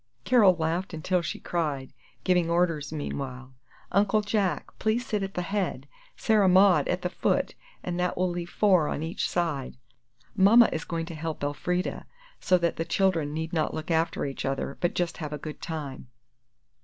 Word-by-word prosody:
Carol 215 Hz, -8 st, +5 dB
laughed 170 Hz, +2 st, -2 dB
until 180 Hz, +3 st, 0 dB
she 170 Hz, -, -4 dB
cried, 150 Hz, -6 st, -2 dB, 0.3 s
giving 180 Hz, -3 st, +2 dB
orders, 170 Hz, -4 st, +1 dB
meanwhile, 130 Hz, -4 st, -5 dB, 0.4 s
"Uncle 205 Hz, +2 st, +3 dB
Jack, 205 Hz, -6 st, 0 dB
please 225 Hz, +3 st, 0 dB
sit 210 Hz, -2 st, -1 dB
at 195 Hz, 0 st, -4 dB
the 180 Hz, -, -1 dB
head, 180 Hz, -8 st, -2 dB, 0.3 s
Sarah 210 Hz, -4 st, +3 dB
Maud 190 Hz, 0 st, +5 dB
at 180 Hz, 0 st, -1 dB
the 180 Hz, -, 0 dB
foot, -, -, 0 dB, 0.3 s
and 180 Hz, 0 st, -3 dB
that 180 Hz, 0 st, 0 dB
will 185 Hz, +1 st, +2 dB
leave 175 Hz, -1 st, -4 dB
four 180 Hz, -3 st, +3 dB
on 150 Hz, -, -3 dB
each 165 Hz, +2 st, -2 dB
side; 160 Hz, -9 st, -2 dB, 0.6 s
Mama 220 Hz, +4 st, +7 dB
is 160 Hz, -, -3 dB
going 165 Hz, -1 st, -3 dB
to 170 Hz, -, -8 dB
help 160 Hz, -1 st, -5 dB
Elfrida, 180 Hz, +5 st, -2 dB, 0.3 s
so 185 Hz, -, +3 dB
that 170 Hz, -1 st, 0 dB
the 165 Hz, -, 0 dB
children 165 Hz, -4 st, +1 dB
need 160 Hz, +2 st, -4 dB
not 160 Hz, -2 st, 0 dB
look 155 Hz, +2 st, -4 dB
after 165 Hz, -1 st, +1 dB
each 135 Hz, -1 st, -4 dB
other, 135 Hz, +1 st, -2 dB
but 175 Hz, -, 0 dB
just 175 Hz, -1 st, -1 dB
have 150 Hz, -2 st, -5 dB
a -, -, -3 dB
good 150 Hz, +1 st, -8 dB
time." 145 Hz, -6 st, -6 dB
170 Hz, 180 wpm, -27 LUFS, 155-185 Hz, 0.6 s, Mama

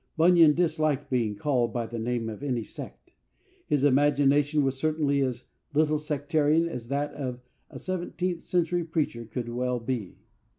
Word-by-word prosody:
Bunyan 165 Hz, -2 st, +6 dB
disliked 155 Hz, -5 st, 0 dB
being 115 Hz, -5 st, 0 dB
called 120 Hz, -1 st, 0 dB
by 120 Hz, 0 st, -2 dB
the 115 Hz, +1 st, -6 dB
name 120 Hz, 0 st, -2 dB
of 110 Hz, +2 st, -6 dB
any 125 Hz, -5 st, -1 dB
sect. -, -, -10 dB, 0.6 s
His 145 Hz, -2 st, +1 dB
imagination 145 Hz, +1 st, +3 dB
was 135 Hz, -1 st, 0 dB
certainly 145 Hz, -1 st, +1 dB
as 130 Hz, -2 st, -2 dB, 0.3 s
little 155 Hz, 0 st, +3 dB
sectarian 150 Hz, +2 st, +1 dB
as 125 Hz, -8 st, -6 dB
that 140 Hz, +3 st, -2 dB
of 125 Hz, -3 st, -5 dB, 0.3 s
a -, -, -9 dB
seventeenth 180 Hz, -1 st, -3 dB
century 175 Hz, 0 st, 0 dB
preacher 155 Hz, -8 st, -2 dB
could 120 Hz, +2 st, -5 dB
well 125 Hz, +1 st, -1 dB
be. 115 Hz, -5 st, -4 dB
145 Hz, 155 wpm, -27 LUFS, 125-155 Hz, 0.6 s, Bunyan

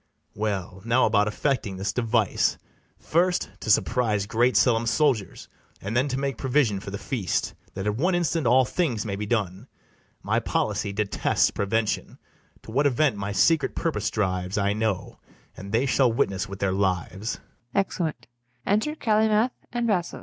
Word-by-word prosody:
Well, 95 Hz, -3 st, -3 dB
now 120 Hz, +3 st, +3 dB
about 105 Hz, -1 st, +3 dB
effecting 105 Hz, -3 st, -1 dB
this 95 Hz, 0 st, -2 dB
device; 115 Hz, -4 st, +1 dB, 0.4 s
First, 180 Hz, +2 st, 0 dB
to -, -, -6 dB
surprise 110 Hz, -2 st, +2 dB
great 120 Hz, +5 st, +2 dB
Selim's 115 Hz, -2 st, +3 dB
soldiers, 125 Hz, -5 st, 0 dB, 0.3 s
And 105 Hz, +4 st, -5 dB
then 130 Hz, +4 st, +2 dB
to 130 Hz, -2 st, -2 dB
make 135 Hz, -3 st, -2 dB
provision 130 Hz, -7 st, +1 dB
for 95 Hz, -, -8 dB
the 100 Hz, -, -4 dB
feast, 105 Hz, -4 st, -2 dB, 0.2 s
That 95 Hz, +1 st, -4 dB
at 105 Hz, 0 st, 0 dB
one 175 Hz, +7 st, +2 dB
instant 165 Hz, -4 st, 0 dB
all 130 Hz, +2 st, +5 dB
things 125 Hz, -, -1 dB
may 100 Hz, -2 st, -2 dB
be 105 Hz, +1 st, -4 dB
done: 105 Hz, 0 st, -2 dB, 0.6 s
My -, -, +1 dB
policy 100 Hz, -, -1 dB
detests 100 Hz, 0 st, +1 dB
prevention. 105 Hz, +1 st, -1 dB, 0.5 s
To -, -, -10 dB
what 140 Hz, +5 st, +3 dB
event 140 Hz, -1 st, +2 dB
my 100 Hz, 0 st, -4 dB
secret 160 Hz, +10 st, +2 dB
purpose 150 Hz, -, -1 dB
drives, 95 Hz, -2 st, -1 dB
I 100 Hz, 0 st, +1 dB
know; 110 Hz, -3 st, -2 dB, 0.4 s
and 100 Hz, +1 st, -9 dB
they 115 Hz, +5 st, +2 dB
shall 130 Hz, -2 st, +3 dB
witness 95 Hz, -4 st, -1 dB
with 100 Hz, -, -6 dB
their 95 Hz, -1 st, 0 dB
lives. 95 Hz, +2 st, -1 dB, 0.4 s
[Exeunt.] 165 Hz, -9 st, -1 dB, 0.4 s
Enter 220 Hz, +10 st, +1 dB
CALYMATH 220 Hz, -1 st, +2 dB, 0.2 s
and 240 Hz, -1 st, -1 dB
BASSOES. 185 Hz, -6 st, -1 dB
115 Hz, 160 wpm, -25 LUFS, 100-140 Hz, 0.6 s, all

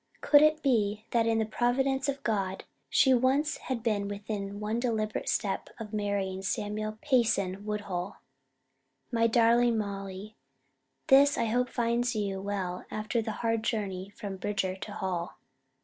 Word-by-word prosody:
Could 290 Hz, -1 st, +6 dB
it 305 Hz, 0 st, +4 dB
be 215 Hz, -5 st, +1 dB
that 230 Hz, -1 st, +2 dB
in 225 Hz, 0 st, +2 dB
the 220 Hz, -, +1 dB
providence 265 Hz, +4 st, +1 dB
of 275 Hz, 0 st, -3 dB
God 195 Hz, -4 st, -1 dB, 0.3 s
she 265 Hz, -, +5 dB
once 265 Hz, +5 st, +2 dB
had 250 Hz, -4 st, -4 dB
been 205 Hz, -3 st, 0 dB
within 205 Hz, 0 st, -5 dB
one 215 Hz, +2 st, -1 dB
deliberate 220 Hz, -4 st, -1 dB
step 195 Hz, -2 st, -1 dB
of 220 Hz, -1 st, -7 dB
marrying 200 Hz, -2 st, -1 dB
Samuel 210 Hz, +2 st, -3 dB
Payson 210 Hz, -8 st, +1 dB
Woodhull? 200 Hz, -3 st, -3 dB, 0.9 s
MY 230 Hz, -1 st, +3 dB
DARLING 235 Hz, 0 st, +4 dB
MOLLY: 200 Hz, 0 st, -5 dB, 0.7 s
This 280 Hz, 0 st, +6 dB
I 230 Hz, -, +1 dB
hope 245 Hz, +3 st, +1 dB
finds 240 Hz, 0 st, 0 dB
you 200 Hz, -2 st, -2 dB
well 190 Hz, -3 st, -3 dB
after 215 Hz, +2 st, -1 dB
the 220 Hz, -, -3 dB
hard 225 Hz, -1 st, +1 dB
journey 200 Hz, -4 st, -2 dB
from 205 Hz, -2 st, -7 dB
Bridger 190 Hz, -1 st, -1 dB
to 200 Hz, +2 st, -8 dB
Hall. 185 Hz, -4 st, -3 dB
215 Hz, 150 wpm, -29 LUFS, 200-240 Hz, 0.9 s, Could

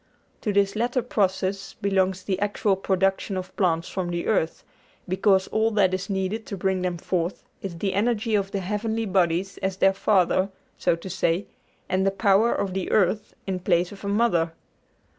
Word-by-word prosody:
To 210 Hz, -, 0 dB
this 200 Hz, 0 st, +2 dB
latter 240 Hz, +2 st, 0 dB
process 195 Hz, -3 st, -1 dB
belongs 190 Hz, -1 st, 0 dB
the 190 Hz, -1 st, -1 dB
actual 205 Hz, 0 st, +1 dB
production 195 Hz, +1 st, 0 dB
of 185 Hz, 0 st, -6 dB
plants 170 Hz, -3 st, +1 dB
from 185 Hz, -2 st, -3 dB
the 170 Hz, 0 st, -2 dB
earth, 165 Hz, -6 st, 0 dB, 0.4 s
because 190 Hz, +1 st, +3 dB
all 220 Hz, +1 st, +2 dB
that 195 Hz, -3 st, +3 dB
is 185 Hz, +1 st, -3 dB
needed 195 Hz, +3 st, -2 dB
to 200 Hz, -, -5 dB
bring 190 Hz, 0 st, 0 dB
them 180 Hz, -1 st, -1 dB
forth 175 Hz, +1 st, -2 dB, 0.2 s
is 185 Hz, -4 st, -5 dB
the 195 Hz, +2 st, -1 dB
energy 225 Hz, +1 st, +1 dB
of 200 Hz, -2 st, +1 dB
the 200 Hz, -1 st, -3 dB
heavenly 220 Hz, +4 st, -2 dB
bodies 185 Hz, -1 st, +1 dB
as 190 Hz, 0 st, -2 dB
their 195 Hz, 0 st, +4 dB
father, 190 Hz, -1 st, +2 dB, 0.3 s
so -, -, +1 dB
to 170 Hz, +3 st, -10 dB
say, 180 Hz, +1 st, 0 dB, 0.4 s
and 185 Hz, +1 st, +1 dB
the 195 Hz, -, +4 dB
power 200 Hz, +3 st, +3 dB
of 195 Hz, -2 st, -1 dB
the 190 Hz, -1 st, -2 dB
earth 205 Hz, +1 st, +1 dB
in 190 Hz, -2 st, -2 dB
place 175 Hz, -1 st, +1 dB
of 200 Hz, 0 st, -11 dB
a -, -, -3 dB
mother. 200 Hz, -6 st, +2 dB
195 Hz, 180 wpm, -25 LUFS, 185-205 Hz, 0.4 s, their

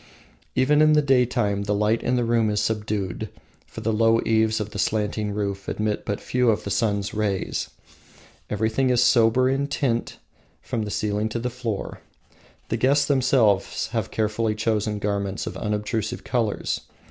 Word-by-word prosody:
Even 145 Hz, +4 st, +4 dB
in 155 Hz, 0 st, +6 dB
the 150 Hz, -, +5 dB
daytime 120 Hz, -7 st, +2 dB
the 105 Hz, 0 st, 0 dB
light 105 Hz, +2 st, +1 dB
in 125 Hz, -, 0 dB
the 120 Hz, -, +1 dB
room 115 Hz, -2 st, +2 dB
is 105 Hz, 0 st, 0 dB
subdued, 105 Hz, -2 st, -2 dB, 0.4 s
for -, -, -9 dB
the 115 Hz, -, 0 dB
low 115 Hz, +1 st, +4 dB
eaves 110 Hz, 0 st, +2 dB
of 105 Hz, 0 st, -4 dB
the 100 Hz, -, -6 dB
slanting 105 Hz, 0 st, 0 dB
roof 100 Hz, -1 st, -3 dB
admit 105 Hz, -1 st, -2 dB
but 100 Hz, -, -2 dB
few 125 Hz, -1 st, +1 dB
of 110 Hz, -, +1 dB
the 100 Hz, -, -4 dB
sun's 100 Hz, -1 st, 0 dB
rays. 105 Hz, -3 st, -2 dB, 0.8 s
Everything 110 Hz, +5 st, 0 dB
is 125 Hz, -1 st, +4 dB
sober 120 Hz, +1 st, +4 dB
in 135 Hz, +2 st, 0 dB
tint 130 Hz, -5 st, -1 dB, 0.4 s
from 110 Hz, -2 st, -3 dB
the -, -, -5 dB
ceiling 105 Hz, +1 st, -1 dB
to 110 Hz, -, -3 dB
the 120 Hz, +1 st, -3 dB
floor; 115 Hz, -5 st, -4 dB, 0.7 s
the -, -, 0 dB
guests 140 Hz, +3 st, +3 dB
themselves 125 Hz, -8 st, +2 dB
have -, -, -2 dB
carefully 110 Hz, 0 st, -1 dB
chosen 110 Hz, -1 st, 0 dB
garments 100 Hz, -1 st, -2 dB
of -, -, -5 dB
unobtrusive 105 Hz, +1 st, -2 dB
colors. 115 Hz, -5 st, -1 dB
110 Hz, 165 wpm, -24 LUFS, 105-120 Hz, 0.8 s, in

